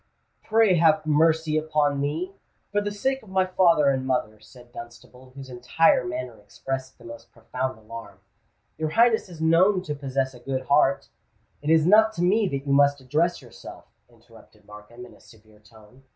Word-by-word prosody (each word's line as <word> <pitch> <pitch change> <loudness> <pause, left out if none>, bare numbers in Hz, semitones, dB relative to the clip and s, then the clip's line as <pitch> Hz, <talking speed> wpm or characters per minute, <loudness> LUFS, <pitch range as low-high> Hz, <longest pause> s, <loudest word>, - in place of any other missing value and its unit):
"Pray 220 -4 +3
have 155 -1 +3
mercy 155 0 +2
upon 150 -2 -1
me—for 185 +6 -5
the 205 - -3
sake 265 +6 -2
of 215 - -17
my 190 0 +1
father 175 -5 +3
and 130 -1 -3
mother!" 110 -5 -2
said 120 +3 -18
Dunstable, 120 +2 -13
whose 135 -1 -10
entire 125 +5 +1
manner 125 -1 -6
expressed 130 +5 -7
the 120 - -19
most 115 0 -12
profound 125 +2 -5
alarm. 115 +1 -11 0.6
"Your 155 -1 -2
Highness 230 +2 +2
is 165 -3 -11
known 180 +4 +3
to 150 - -4
possess 135 -2 -3
a 125 - -14
good 130 +1 -4
heart——" 140 +1 +1 0.5
"It 145 - -4
is 160 -1 +4
not 220 +4 +5
to 175 - -3
me 200 +4 +2
that 140 -3 -5
you 140 - 0
must 140 0 +3
address 155 +7 -1
yourself," - - -13 0.2
interrupted - - -21
Markham, 105 +4 -13
in - - -16
a - - -20
severe 110 -1 -21
tone. 110 +3 -20
140 Hz, 175 wpm, -24 LUFS, 125-170 Hz, 0.6 s, not